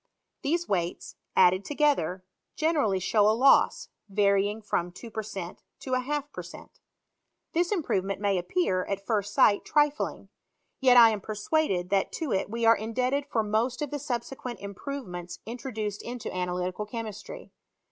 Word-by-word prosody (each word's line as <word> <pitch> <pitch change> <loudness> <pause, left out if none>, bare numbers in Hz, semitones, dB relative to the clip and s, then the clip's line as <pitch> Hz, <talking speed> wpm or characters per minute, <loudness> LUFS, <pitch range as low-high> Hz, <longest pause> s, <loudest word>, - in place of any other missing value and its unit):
These 340 +5 0
weights, 175 -3 -2 0.2
added 185 +2 +5
toge 295 +2 +3
ther, 180 +3 -4 0.3
generally 300 - +1
show 205 +2 +3
a 220 - +2
loss, 270 +3 +4 0.2
varying 200 +1 +2
from 175 -4 -1
two 225 +6 -10
per 220 - -3
cent, 195 -4 -7 0.2
to 260 - -4
a 255 - +3
half 290 +2 -3
per - - -5
cent. - - -13 0.7
This 345 +3 +1
improvement 195 - -1
may 200 -1 +1
a'p 175 - -8
pear 190 - +1
at 200 0 -3
first 205 -2 0
sight 205 0 +4
trifling; 295 0 0 0.5
yet 255 -2 +6
I 230 -2 +9
am 210 -2 -3
persuaded 210 - -1
that 195 -1 +2
to 315 -7 -3
it 190 - 0
we 230 +1 -1
are 230 0 +7
indebted 255 +6 -1
for 225 -5 0
most 230 +6 0
of 290 - -5
the 290 - -3
subsequent 250 -1 -4
im 200 0 -7
provements 180 -9 -6
introduced 220 -3 -4
into 240 -5 -6
analytical 180 +3 -2
chemistry. 220 - -7
220 Hz, 165 wpm, -28 LUFS, 195-270 Hz, 0.7 s, I